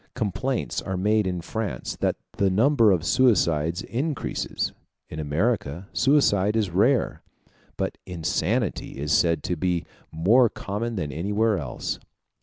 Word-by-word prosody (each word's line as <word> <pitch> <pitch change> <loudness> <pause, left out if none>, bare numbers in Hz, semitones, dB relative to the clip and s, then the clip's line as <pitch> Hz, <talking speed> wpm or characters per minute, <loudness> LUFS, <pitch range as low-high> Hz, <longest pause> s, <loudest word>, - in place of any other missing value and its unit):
Complaints 120 +3 -2
are 95 -1 -3
made 105 +2 +2
in 90 -2 -2
France 110 +4 -4
that - - 0 0.2
the 100 - +3
number 115 +2 +4
of 85 -3 +1
suicides 85 -6 +2
increases; 140 +5 -2 0.4
in 80 - -6
America 85 +2 -1
suicide 110 -5 +3
is 105 -5 +1
rare, 115 +8 +2 0.6
but - - -3
insanity 90 - -1
is 75 +2 -3
said 85 +2 +3
to 90 - -1
be 90 +1 -1 0.3
more 110 +10 +4
common 110 +5 -4
than 75 -7 -3
anywhere 105 +7 0
else. - - -4
100 Hz, 130 wpm, -25 LUFS, 85-115 Hz, 0.6 s, number